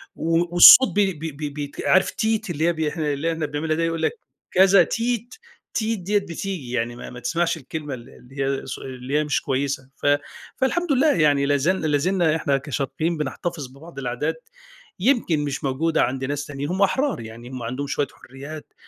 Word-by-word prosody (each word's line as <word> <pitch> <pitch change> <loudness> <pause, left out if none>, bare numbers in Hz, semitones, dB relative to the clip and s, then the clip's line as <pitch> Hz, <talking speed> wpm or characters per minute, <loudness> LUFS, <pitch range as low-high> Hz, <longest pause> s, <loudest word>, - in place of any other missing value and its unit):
و 165 +1 0
والصوت 260 +9 +10
بي 195 -2 +3
بي 160 +1 -6
بي 145 +1 -5
بي 145 0 -6
عارِف 185 - +4
"تيت" 220 -2 -1
اللي 170 +1 +1
بي 160 -2 -1
إحنا 150 -3 -2
اللي 160 +4 -1
إحنا 160 -1 -2
بنعمِلها 150 +2 -2
دي، 165 - -1
هيقول 165 -1 -1
لك - - +1 0.4
كذا 190 0 +6
"تيت"، 235 - -2 0.4
"تيت" 225 -2 -1
ديّة 205 +4 0
بتيجي، 185 -7 -4
يعني 120 -1 -1
ما - - -8
ما 125 - -9
تسمَعش 170 +7 0
الكلمة 145 0 -6
ال 120 -1 -9
اللي 135 +2 -7
هي 135 0 -2
صو - - -6
اللي 130 +2 -3
هي 150 - +2
مش 145 - 0
كويِسة. 135 0 -2
ف - - -3 0.5
فالحمد 310 +5 0
لله 285 +3 +4
يعني 145 -3 +3
لا 145 0 +2
زال 185 +7 +1
لا 150 -2 +2
زلنا 175 0 +1
إحنا 140 -3 +1
كشرقيين 145 +4 -2
بنحتفظ 150 +1 -4
ببعض 140 +3 -12
العادات، 150 - -3 0.5
يمكن 225 - +2
مش 145 0 -3
موجودة 145 +5 +1
عند 130 +2 -2
ناس 145 +1 -3
تانيين، 145 +1 -5
هُم 190 +3 -2
أحرار 260 - +1
يعني، 115 +2 -10
هُم 130 -2 -6
عندهم 130 +5 -4
شوية 140 0 -1
حُرّيات 140 +4 -10
155 Hz, 195 wpm, -23 LUFS, 135-175 Hz, 0.5 s, والصوت